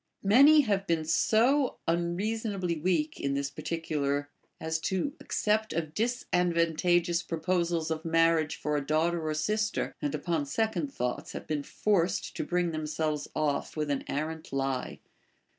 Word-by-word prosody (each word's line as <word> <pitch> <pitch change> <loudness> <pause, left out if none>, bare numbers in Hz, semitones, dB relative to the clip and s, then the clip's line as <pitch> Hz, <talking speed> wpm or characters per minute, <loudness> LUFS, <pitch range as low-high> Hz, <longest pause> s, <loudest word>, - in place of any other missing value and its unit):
Many 280 +10 +7
have 200 -6 0
been 165 -2 +1
so 245 - +3
unreasonably 185 +3 -1
%veak 160 -2 0
in 140 0 -1
this 140 0 -2
particular 145 -3 -2 0.3
as 160 0 -2
to 190 - -1
accept 215 +1 0
of 155 -2 -3
dis 235 +6 -1
advantageous 170 0 +2
proposals 170 0 -1
of 160 0 -2
marriage 165 -1 +2
for 150 0 -2
a 145 - 0
daughter 160 +3 +1
or 155 -1 -1
sister, 215 +7 -1
and 145 0 -1
upon 155 -1 -1
second 225 - -1
thoughts 125 - -3
have - - -6
been 150 -2 -1
forced 180 +3 0
to - - -2
bring 175 -1 0
them 155 -1 -3
selves 155 -1 -2
off 150 +1 -1
with 150 -1 -1
an 140 - -1
arrant 155 +2 -4
lie. 135 -2 -2
165 Hz, 150 wpm, -29 LUFS, 155-190 Hz, 0.3 s, Many